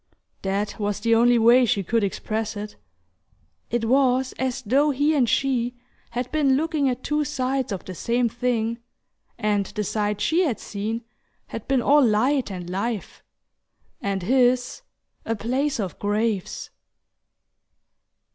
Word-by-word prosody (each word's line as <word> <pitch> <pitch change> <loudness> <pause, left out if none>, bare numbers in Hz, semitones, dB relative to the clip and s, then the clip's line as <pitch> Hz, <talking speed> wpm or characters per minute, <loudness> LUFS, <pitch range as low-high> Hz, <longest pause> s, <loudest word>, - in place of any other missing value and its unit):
That 200 +2 -2
was 205 -1 -1
the 230 +1 +2
only 240 +1 +5
way 235 +3 +6
she 225 -4 +1
could 225 +4 +1
express 215 +2 -2
it. 210 0 -6 0.9
It 235 -1 0
was 260 +1 +2
as 260 0 -2
though 275 +7 +3
he 290 +3 +2
and 255 -6 +2
she 245 -2 +1 0.3
had 245 +1 -4
been 280 -4 +3
looking 305 -3 +1
at 250 0 -3
two 300 0 0
sides 265 -3 -1
of 195 - -4
the 185 - -6
same 235 +7 0
thing, 235 -1 -1 0.6
and 210 -3 0
the 210 - -3
side 210 0 -1
she 330 - +2
had 285 -11 0
seen 220 +3 -4 0.5
had - - -7
been 265 -3 +2
all 290 +1 +5
light 250 +4 +2
and 180 -3 -6
life, 200 +4 -3 0.8
and 195 -2 -2
his 250 - +2 0.4
a 225 - -1
place 260 +6 -1
of 190 -4 -4
graves... 210 -1 -1
235 Hz, 145 wpm, -24 LUFS, 210-265 Hz, 0.9 s, way